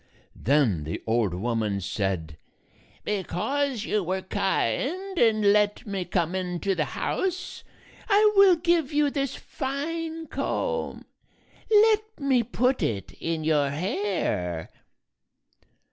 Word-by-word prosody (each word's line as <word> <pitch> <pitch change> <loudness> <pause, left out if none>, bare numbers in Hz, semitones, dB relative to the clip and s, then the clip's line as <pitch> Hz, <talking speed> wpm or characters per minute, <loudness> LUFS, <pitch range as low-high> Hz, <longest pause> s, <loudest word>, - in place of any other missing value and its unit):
Then 120 - +2
the 80 +2 -5
old 110 -5 +1
woman 110 0 -1
said, 95 -4 -2 0.7
"Because 225 +5 -1
you 210 - +1
were 185 +2 -2
kind 285 - -1
and 215 -3 +4
let 210 +3 +1
me 195 -4 -3
come 175 -1 0
into 185 +1 -1
the 160 -5 0
house, 370 -1 -2 0.5
I 420 +1 +5
will 395 -2 +7
give 335 -3 +1
you 295 -1 +2
this 275 -2 -2
fine 320 +4 -4
comb. 485 +8 -3 0.6
Let 435 0 +4
me 270 -4 +3
put 250 +3 0
it 100 -4 -2
in 165 -1 -2
your 150 -3 +2
hair." 145 - -2
205 Hz, 115 wpm, -26 LUFS, -, 0.7 s, will